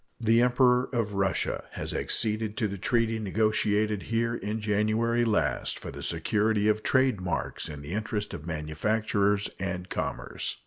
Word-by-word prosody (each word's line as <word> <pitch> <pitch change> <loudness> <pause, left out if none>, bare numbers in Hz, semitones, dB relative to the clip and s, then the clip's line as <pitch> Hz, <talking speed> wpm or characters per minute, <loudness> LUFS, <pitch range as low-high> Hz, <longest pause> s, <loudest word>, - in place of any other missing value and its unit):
The 115 0 +4
Emperor 125 0 +4
of 115 -4 0
Russia 100 -1 0
has - - -4
acceded 110 -1 -1
to 110 - +1
the 100 -1 -6
treaty 115 +1 +1
negotiated 105 0 +1
here 115 0 +1
in 110 -1 -3
January 110 +3 +1
last 110 -3 +1
for - - -7
the - - -8
security 105 0 +1
of 110 0 +2
trade 130 -6 +2
marks 90 -2 -3
in 75 -2 -7
the 75 +5 -6
interest 105 -1 -2
of 75 - -7
manufacturers 100 +6 0
and 90 -1 -3
commerce. - - -3
110 Hz, 150 wpm, -28 LUFS, 100-115 Hz, -, The